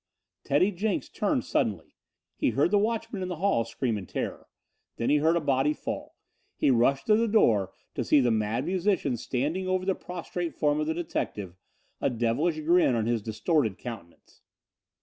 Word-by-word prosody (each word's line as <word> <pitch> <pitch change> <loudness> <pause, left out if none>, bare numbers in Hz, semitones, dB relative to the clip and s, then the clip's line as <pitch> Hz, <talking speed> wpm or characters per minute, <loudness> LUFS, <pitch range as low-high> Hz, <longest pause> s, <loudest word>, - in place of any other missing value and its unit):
Teddy 180 +9 +3
Jenks 200 +2 -2
turned - - -1
suddenly. - - -1 0.4
He - - +1
heard 145 +6 +2
the 205 - +4
watchman 225 -1 -2
in 185 - -2
the 180 - -3
hall 180 -8 +1
scream 115 -2 -2
in 95 - -9
terror. - - -4 0.5
Then 115 - 0
he 150 - +5
heard 160 +3 +3
a - - +3
body 140 -1 +1
fall. - - -6 0.4
He - - +3
rushed 135 +3 +2
to 215 - +5
the 230 +1 +2
door 110 - +3 0.2
to 125 - -2
see 145 - +4
the 125 -3 +3
Mad 110 +4 0
Musician 185 -6 0
standing 145 +11 -2
over 185 0 0
the 190 - +2
prostrate 175 -1 -5
form 150 0 +1
of 155 - -1
the 160 - -1
detective, 105 - -4 0.5
a - - +2
devilish 125 +8 0
grin 170 -4 +4
on 110 -2 0
his 115 -1 0
distorted 110 - 0
countenance. 110 -9 -10
150 Hz, 180 wpm, -27 LUFS, 120-180 Hz, 0.5 s, he